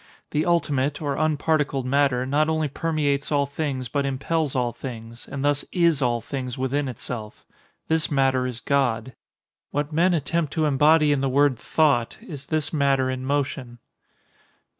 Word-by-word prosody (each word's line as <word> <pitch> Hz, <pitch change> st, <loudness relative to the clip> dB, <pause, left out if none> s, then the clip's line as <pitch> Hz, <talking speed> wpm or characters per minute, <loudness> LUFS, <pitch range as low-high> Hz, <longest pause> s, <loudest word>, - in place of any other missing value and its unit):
The 150 Hz, +3 st, 0 dB
ultimate, 150 Hz, -4 st, +1 dB
or 145 Hz, -3 st, -2 dB
unparticled 150 Hz, -3 st, 0 dB
matter, 130 Hz, -1 st, +2 dB
not 150 Hz, +4 st, +1 dB
only 160 Hz, -1 st, +1 dB
permeates 145 Hz, -1 st, -1 dB
all 145 Hz, -1 st, +2 dB
things 140 Hz, -3 st, -3 dB
but 140 Hz, +4 st, -1 dB
impels 140 Hz, +2 st, -1 dB
all 125 Hz, -2 st, +1 dB
things; 115 Hz, -1 st, -9 dB
and 140 Hz, 0 st, -4 dB
thus 145 Hz, 0 st, +2 dB
is 170 Hz, -5 st, +2 dB
all 120 Hz, -2 st, +1 dB
things 125 Hz, -2 st, -5 dB
within 135 Hz, +2 st, -1 dB
itself. 115 Hz, -3 st, -7 dB, 0.4 s
This 160 Hz, -1 st, +1 dB
matter 135 Hz, -3 st, +2 dB
is 120 Hz, -2 st, -5 dB
God. 130 Hz, -3 st, 0 dB, 0.6 s
What 145 Hz, +2 st, -2 dB
men 175 Hz, +3 st, +3 dB
attempt 160 Hz, 0 st, -1 dB
to 160 Hz, -2 st, +1 dB
embody 150 Hz, +2 st, +4 dB
in 145 Hz, -2 st, +1 dB
the 135 Hz, -, +1 dB
word 140 Hz, 0 st, +3 dB
"thought," 140 Hz, -1 st, +1 dB
is 145 Hz, -5 st, -9 dB
this 155 Hz, -1 st, -1 dB
matter 135 Hz, -3 st, +2 dB
in 130 Hz, 0 st, -4 dB
motion. 135 Hz, -3 st, -2 dB
140 Hz, 160 wpm, -24 LUFS, 130-150 Hz, 0.6 s, embody